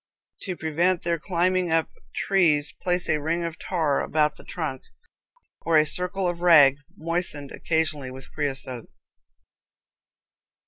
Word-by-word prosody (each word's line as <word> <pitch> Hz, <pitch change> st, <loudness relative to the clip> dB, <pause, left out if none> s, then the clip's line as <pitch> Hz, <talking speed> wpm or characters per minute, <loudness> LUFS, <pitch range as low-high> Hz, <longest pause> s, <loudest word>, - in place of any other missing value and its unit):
To 185 Hz, -4 st, -5 dB
prevent 170 Hz, +3 st, 0 dB
their 170 Hz, -1 st, -1 dB
climbing 180 Hz, 0 st, 0 dB
up 165 Hz, 0 st, +2 dB, 0.3 s
trees, 155 Hz, -7 st, +2 dB
place 180 Hz, 0 st, 0 dB
a 155 Hz, -1 st, 0 dB
ring 165 Hz, +3 st, -1 dB
of 165 Hz, -1 st, -5 dB
tar 160 Hz, -6 st, 0 dB
about 150 Hz, -1 st, +1 dB
the -, -, -15 dB
trunk, 155 Hz, -6 st, -5 dB, 0.8 s
or 165 Hz, -1 st, +2 dB
a 155 Hz, -, +5 dB
circle 180 Hz, +4 st, +3 dB
of 175 Hz, -1 st, -3 dB
rag 150 Hz, -6 st, +6 dB, 0.2 s
moistened 165 Hz, -4 st, -3 dB
occasionally 155 Hz, -5 st, -1 dB
with 130 Hz, +1 st, -11 dB
creosote. 135 Hz, -5 st, -4 dB
160 Hz, 130 wpm, -24 LUFS, 150-175 Hz, 0.8 s, rag